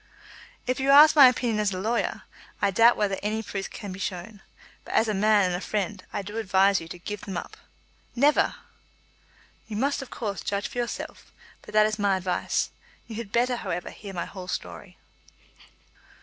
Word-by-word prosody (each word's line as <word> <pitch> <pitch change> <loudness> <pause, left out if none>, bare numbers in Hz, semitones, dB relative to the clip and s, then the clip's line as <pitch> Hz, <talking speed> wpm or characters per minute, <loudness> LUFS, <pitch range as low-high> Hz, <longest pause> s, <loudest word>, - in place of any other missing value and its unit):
"If 255 +1 -1
you 270 +1 0
ask 295 +3 +8
me 295 - +7
my 265 - +12
opinion 240 -3 0
as 210 -1 +1
a 185 - -4
lawyer, 230 +4 -1 0.4
I 200 - +2
doubt 230 +4 +5
whether 200 -2 0
any 215 +2 -2
such - - -11
proof 195 -1 -3
can 205 -3 -8
be 185 - -8
shown. 190 +2 -5 0.4
But - - -6
as 225 - +4
a 215 - 0
man 210 +1 +4
and 180 - 0
a 175 - -3
friend 205 -2 -3
I - - -3
do 205 +3 -7
advise 195 -2 +3
you 165 - -9
to 180 - -8
give 205 +3 -6
them 190 -3 -5
up." - - -7 0.6
"Never!" 285 +4 +3 1.1
"You 210 - -5
must, 280 +4 0
of 270 - -9
course, 205 -4 -4
judge 200 0 -2
for 245 - -5
yourself; 240 -1 -5 0.3
but - - -13
that 215 0 +6
is 215 0 -2
my 200 -2 +2
advice. 180 -1 -1 0.3
You 220 - -8
had 225 -3 -6
better, 245 +2 +1
however, 175 -5 -4
hear 200 -2 -9
my 170 - -2
whole 185 -2 -9
story." 90 - -6
210 Hz, 200 wpm, -26 LUFS, 190-230 Hz, 1.1 s, my